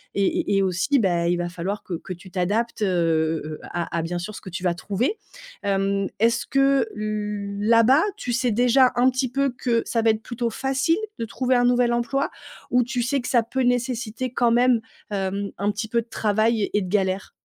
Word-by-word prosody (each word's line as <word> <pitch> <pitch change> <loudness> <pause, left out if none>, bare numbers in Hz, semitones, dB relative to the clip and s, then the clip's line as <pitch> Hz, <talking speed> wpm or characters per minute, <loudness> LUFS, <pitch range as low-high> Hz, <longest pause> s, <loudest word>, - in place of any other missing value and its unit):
Et 200 -1 +2 0.3
et - - +3
et 195 - +3
aussi, 190 +10 +1
bah, 175 -4 +1
il 175 - +2
va 175 0 -2
falloir 185 +4 -4
que 175 - -4
que 185 - -7
tu 180 +1 -14
t'adaptes, 215 +5 -1
heu 165 -4 +1
heu, 155 0 -7
à 170 -1 -4
à - - +1
bien 175 +2 -3
sûr 210 +4 -6
ce - - -8
que 190 - -9
tu 180 +1 -6
vas 175 -1 +2
trouver. 215 - -2 0.5
Hem, 195 0 0
est-ce 230 +1 +2
que 275 +7 +3
là-bas, 215 - +2
tu 245 - -4
sais 250 -1 +1
déjà 250 +3 +4
un 250 +2 +4
petit 255 0 -1
peu 275 +1 0
que 230 -2 +1
ça 230 - 0
va 225 0 +4
être 220 0 -4
plutôt 235 -1 -2
facile 270 - 0 0.2
de 230 - -1
trouver 255 +3 0
un 245 0 +3
nouvel 245 -1 +3
emploi? 240 +4 0 0.4
Ou 250 0 +4
tu 245 0 -2
sais 275 +3 0
que 250 - -6
ça 240 -3 +3
peut 260 +3 -2
nécessiter 245 -1 -1
quand 240 -1 +2
même, 245 -1 +4 0.3
hem, 200 0 -2
un 205 +1 0
petit 210 +1 -5
peu 235 0 +1
de 235 - -15
travail 220 +1 +1
et - - -2
et - - +1
de 185 - -4
galère? 190 -1 0
225 Hz, 215 wpm, -23 LUFS, 195-245 Hz, 0.5 s, déjà